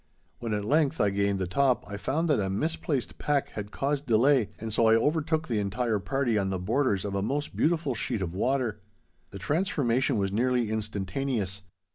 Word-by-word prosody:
When 115 - -4
at 105 -1 -3
length 145 +3 +2
I 100 - +3
gained 100 0 +1
the 95 - -1
top 130 +7 +2
I 100 - -6
found 145 +11 -1
that 150 -7 +3
a 95 -2 -1
misplaced 145 - -2
pack 145 -2 0
had 105 -1 -6
caused 140 +4 -2
delay, 120 +1 +4
and 110 -1 -5
so 115 +1 +3
I 110 - +6
overtook 155 +5 +1
the 115 -4 0
entire 105 +2 0
party 125 0 0
on 95 -1 -1
the 95 - -1
borders 105 +1 0
of 100 - -3
a 100 - 0
most 145 +8 -2
beautiful 160 -4 +1
sheet 110 -3 -2
of 85 -2 -4
water. 120 0 0 0.5
The - - -8
transformation 135 - +1
was 100 -1 0
nearly 120 +1 +1
instantaneous. 105 0 -2
115 Hz, 190 wpm, -28 LUFS, 100-140 Hz, 0.5 s, I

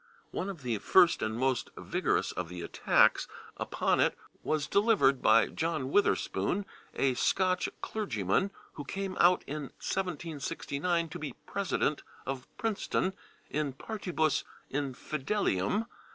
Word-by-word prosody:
One 190 - -2
of 170 -8 -7
the 115 -4 -1
first 175 - +5
and 110 +1 -1
most 130 0 +1
vigorous - - 0
of 90 -2 -4
the 90 -1 -6
attacks - - +3 0.3
upon - - +1
it - - +3 0.2
was 155 -1 0
delivered 200 - +3
by 115 - +6
John 155 -5 -2
Witherspoon, 200 0 +1 0.3
a 135 -1 +2
Scotch 185 +7 +2
clergyman 130 - 0 0.2
who 145 - -6
came 190 +5 -4
out 180 +1 +5
in 150 0 -4
1769 170 -1 -2
to - - -7
be 145 -4 -4
president 185 -6 0 0.2
of 135 -1 -4
Princeton 215 -4 0 0.4
/in 145 -3 -1
partibus 175 -8 0 0.3
infidelium 145 - 0
155 Hz, 125 wpm, -31 LUFS, 135-190 Hz, 0.4 s, by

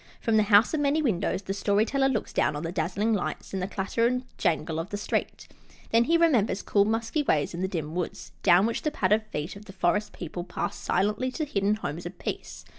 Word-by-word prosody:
From 225 - +1
the - - +6
House 210 +6 +6
of 310 - +1
Many 290 +2 +2
Windows 200 -5 0
the 195 - -3
Story 205 +1 +2
Teller 270 +2 +1
looks 235 -5 -2
down 150 - +1
on 145 - -4
the 165 - -3
dazzling 190 +6 0
lights 200 - -3
and 190 - -2
the 185 - -1
clatter 200 +4 0
and 250 +1 -1 0.2
jangle 160 -1 0
of 165 +4 -4
the 205 - -3
street. 205 - -3 0.4
Then 230 +1 +4
he 335 +4 +4
remembers 240 - +2
cool, 200 -1 +3
musky 225 +7 0
ways 155 - +1
in 170 - -4
the 190 - +1
dim 160 -4 -4
woods, 125 - -4
down 175 - +5
which 230 - -1
the 305 - 0
padded 210 -7 +2
feet 155 -3 -4
of 205 +1 -12
the 195 - -11
forest 200 +3 0
people 175 0 -6
pass 180 - -4
silently 210 +7 0
to 310 - -2
hidden 205 -6 +1
homes 175 -5 -5
of 175 - -10
peace. - - -6
200 Hz, 230 wpm, -27 LUFS, 175-230 Hz, 0.4 s, the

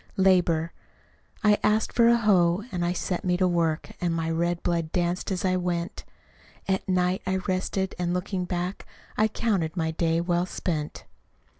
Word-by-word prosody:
Labor 175 -4 +3 0.7
I 210 -1 +4
asked 215 +1 +1
for 235 -1 +5
a 235 0 +6
hoe, 190 -4 +3
and 175 -2 -2
I 175 - +1
set 180 +1 -2
me 180 -2 +1
to 185 0 +3
work, 165 -2 0
And 170 -2 0
my 165 0 -1
red 170 +1 -1
blood 170 -2 -1
danced 175 +2 -1
as 190 +1 -1
I 185 0 +2
went: 175 -1 -3 0.6
At 190 0 -1
night 180 0 +1
I 190 - +1
rested, 190 0 -2
and 175 -1 0
looking 180 +1 -2
back, 180 +2 -4 0.3
I 215 - +3
counted 195 -7 -1
my 160 -1 0
day 165 0 +1
well 175 +1 0
spent. 155 -6 -4
180 Hz, 170 wpm, -26 LUFS, 170-190 Hz, 0.7 s, a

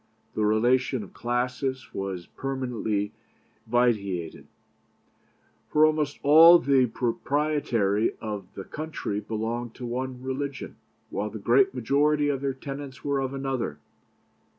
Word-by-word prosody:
The 110 - -1
relation 120 +3 +2
of 100 - -13
classes 125 +2 -2
was 95 -3 -4
permanently 125 -6 -3 0.6
vitiated; 105 -8 0 1.2
for 155 +1 +5
almost 155 -2 0
all 165 +4 +9
the 135 -4 +3
proprietary 120 -4 0
of 105 -4 -5
the 95 - -6
country 155 -9 -4
belonged 115 +2 -4
to 125 - -7
one 125 +1 -4
religion, 135 +1 -4 0.3
while - - -2
the - - -7
great 390 -1 +3
majority 145 +1 +2
of 135 -2 -1
their 135 -1 -1
tenants 135 -1 -8
were 140 -1 +1
of 135 -1 -2
another. 135 - -2
130 Hz, 120 wpm, -26 LUFS, 110-140 Hz, 1.2 s, all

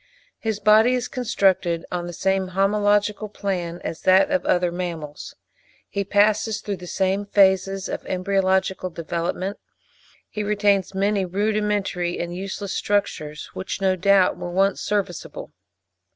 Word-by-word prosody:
His 220 -2 -2
body 215 +4 +5
is 250 - -2
constructed 190 -8 +1
on 175 -1 -3
the - - -5
same 190 +2 0
homological 205 +1 +2
plan 175 -5 -3
as 165 - -5
that 190 +10 +4
of 280 - +1
other 180 -1 +2
mammals. 170 -4 -6 0.5
He 200 - -2
passes 210 +2 +2
through 200 -2 -4
the 180 0 -10
same 190 +2 0
phases 195 -1 +3
of - - -5
embryological 190 0 0
development. 170 +4 -3 0.7
He 210 - -5
retains 205 -2 +1
many 200 0 +1
rudimentary 200 -2 -1
and 175 0 -4
useless 195 +1 -5
structures, 155 -7 -2
which 190 0 -5
no 190 -1 +2
doubt 190 0 +3
were 175 - -5
once 195 +3 +1
serviceable. 200 -4 -3
195 Hz, 135 wpm, -23 LUFS, 180-205 Hz, 0.7 s, body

